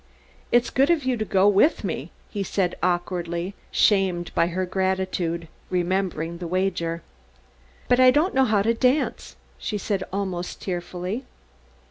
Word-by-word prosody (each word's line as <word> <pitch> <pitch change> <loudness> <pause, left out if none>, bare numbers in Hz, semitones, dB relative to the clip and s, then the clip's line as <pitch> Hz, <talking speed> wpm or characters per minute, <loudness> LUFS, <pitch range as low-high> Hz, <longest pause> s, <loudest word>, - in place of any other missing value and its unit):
"It's 240 0 +3
good 270 +4 +3
of 335 -4 +3
you 255 -1 +2
to 215 - -1
go 195 -1 +3
with 205 +10 +4
me," - - -3 0.2
he 205 - -3
said 185 -1 0
awkwardly, 175 0 -1 0.2
shamed 190 -4 +2
by 170 - +3
her 185 +2 -2
gratitude, 185 -3 -1 0.2
remembering 175 -2 -1
the 175 - -4
wager. 175 -2 -1 0.8
"But 245 - +4
I 255 0 +8
don't 300 +8 +3
know 265 0 +4
how 210 -4 +2
to 230 +2 +3
dance," 255 +5 0 0.2
she 210 - -3
said 200 -1 -2
almost 185 -2 -3
tearfully. 180 +5 -4
190 Hz, 145 wpm, -24 LUFS, 175-215 Hz, 0.8 s, I